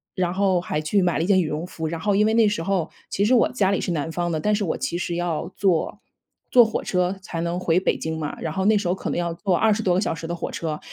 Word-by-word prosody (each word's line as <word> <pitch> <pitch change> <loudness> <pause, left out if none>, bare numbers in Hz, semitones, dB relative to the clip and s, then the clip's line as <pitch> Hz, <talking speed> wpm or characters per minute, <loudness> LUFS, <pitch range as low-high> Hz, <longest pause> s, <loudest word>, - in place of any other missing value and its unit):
然 180 -2 0
后 190 -2 +2
还 155 -3 -2
去 185 +5 +1
买 175 - +1
了 160 - +1
一 - - -2
件 195 -2 +4
羽 170 - +1
绒 155 +3 -3
服。 160 -3 -5
然 165 0 -4
后 205 +3 +1
因 210 +2 +4
为 220 - +2
那 225 -2 +5
时 205 -5 -1
候 190 -3 0 0.2
其 200 - 0
实 250 +4 +4
我 230 - +4
家 200 -6 +1
里 200 - +1
是 180 - -2
南 160 0 -2
方 175 0 -2
的， 155 - -1
但 210 +7 +1
是 205 - -1
我 170 - -1
其 255 -10 -2
实 175 -1 -3
要 175 0 -2
坐 185 -5 0 0.5
坐 245 - +8
火 220 -1 -2
车 180 +1 0
才 165 -2 -4
能 170 +1 -2
回 175 0 +2
北 - - 0
京 160 0 -3
嘛， 150 -2 -5
然 160 -1 -4
后 190 +1 -1
那 215 +1 +5
时 200 -3 -2
候 175 - +2
可 - - -4
能 - - -2
要 170 -1 -1
坐 180 +1 0
20 220 +1 +2
多 180 -4 +2
个 185 - +2
小 - - 0
时 165 0 -7
的 175 - -3
火 - - -5
车。 155 -2 -4
180 Hz, 325 characters per minute, -23 LUFS, 165-200 Hz, 0.5 s, 坐